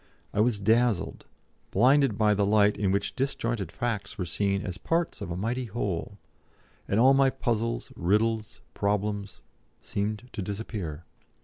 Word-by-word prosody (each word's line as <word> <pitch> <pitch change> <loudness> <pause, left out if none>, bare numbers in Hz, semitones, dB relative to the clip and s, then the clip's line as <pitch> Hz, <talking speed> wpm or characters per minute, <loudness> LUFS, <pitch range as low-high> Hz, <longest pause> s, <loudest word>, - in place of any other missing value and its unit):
I 105 - -1
was 110 -1 +3
dazzled, 115 0 +1 0.4
blinded 130 +1 +4
by 105 -1 +4
the 100 0 +1
light 105 0 +4
in 100 -2 0
which 100 +1 -1
disjointed 120 - -2
facts 115 -2 -3
were 90 - -2
seen 100 +4 0
as 90 +1 -5
parts 165 -4 -1
of 100 - -4
a 85 - -3
mighty 120 +6 -1
whole, 100 -3 -3 0.7
and 100 - +1
all 130 +3 +7
my 135 0 +5
puzzles, 115 -3 -2
riddles, 105 +4 0
problems, 100 -1 -2 0.4
seemed 105 +4 -3
to - - -3
disappear. 95 -6 -5
105 Hz, 145 wpm, -28 LUFS, 100-120 Hz, 0.7 s, all